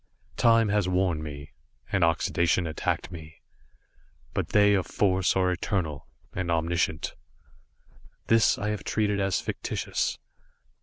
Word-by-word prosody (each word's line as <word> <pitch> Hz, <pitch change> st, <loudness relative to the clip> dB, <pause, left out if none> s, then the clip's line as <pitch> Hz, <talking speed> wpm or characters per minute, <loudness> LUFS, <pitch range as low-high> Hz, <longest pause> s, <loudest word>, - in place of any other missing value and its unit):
Time 115 Hz, -2 st, +4 dB
has 100 Hz, -2 st, +1 dB
worn 90 Hz, -4 st, +1 dB
me, 75 Hz, -2 st, -8 dB, 0.4 s
and 95 Hz, -3 st, +2 dB
oxidation 85 Hz, +2 st, +2 dB
attacked 80 Hz, +1 st, -2 dB
me, 80 Hz, -2 st, -10 dB, 0.9 s
but -, -, -2 dB
they 105 Hz, 0 st, +5 dB
of 95 Hz, -3 st, +1 dB
Force 95 Hz, -2 st, +1 dB
are 95 Hz, -1 st, +2 dB
eternal, 85 Hz, -5 st, -2 dB, 0.3 s
and 95 Hz, -1 st, -3 dB
omniscient. 85 Hz, -1 st, 0 dB, 1.1 s
This 115 Hz, -1 st, +4 dB
I 105 Hz, -, -2 dB
have 105 Hz, -1 st, -3 dB
treated 105 Hz, -2 st, 0 dB
as 95 Hz, -1 st, +1 dB
fictitious. -, -, -2 dB
90 Hz, 120 wpm, -27 LUFS, 80-100 Hz, 1.1 s, they